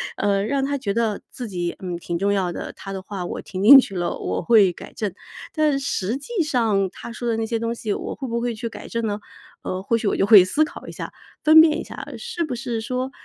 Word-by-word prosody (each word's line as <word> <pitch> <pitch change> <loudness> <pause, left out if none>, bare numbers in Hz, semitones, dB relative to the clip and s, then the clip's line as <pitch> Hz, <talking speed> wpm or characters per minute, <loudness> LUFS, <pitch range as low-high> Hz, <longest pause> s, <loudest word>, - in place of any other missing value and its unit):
呃， 200 -1 +1
让 270 +4 0
他 285 +1 -1
觉 210 -8 -2
得 225 -3 0
自 245 -3 -7
己， 175 -4 -3
嗯， 180 -2 -5
挺 170 0 -4
重 200 +3 +1
要 190 -3 0
的， - - -6
他 195 - -9
的 195 - -4
话 190 0 -6
我 175 - -5
听 185 -1 -6
进 270 +7 +10
去 200 -7 -2
了 175 -1 -2
我 - - -3
会 210 -6 +5
改 - - -11
正。 205 -4 -3 0.4
但 305 -3 +2
实 260 -4 -2
际 400 +7 -3
上 225 - +1
他 235 - -9
说 240 +1 -4
的 225 - 0
那 225 - -1
些 230 0 -2
东 230 +1 -2
西 215 -3 -2
我 - - -5
会 270 - -6
不 235 0 -2
会 240 -1 -2
去 230 +2 -4
改 - - -9
正 230 0 -2
呢？ 205 -1 -2 0.4
呃， 185 - -3
或 230 - +1
许 225 -2 -1
我 - - +1
就 - - +3
会 205 -3 +9
思 240 +12 +2
考 - - -11
一 - - -6
下， - - -7 0.3
分 315 0 +9
辨 320 -1 +3
一 - - -4
下， - - -8
是 465 -8 -4
不 290 -6 -3
是 240 -2 -3
说， 255 +2 -3
225 Hz, 275 characters per minute, -22 LUFS, 195-265 Hz, 0.4 s, 进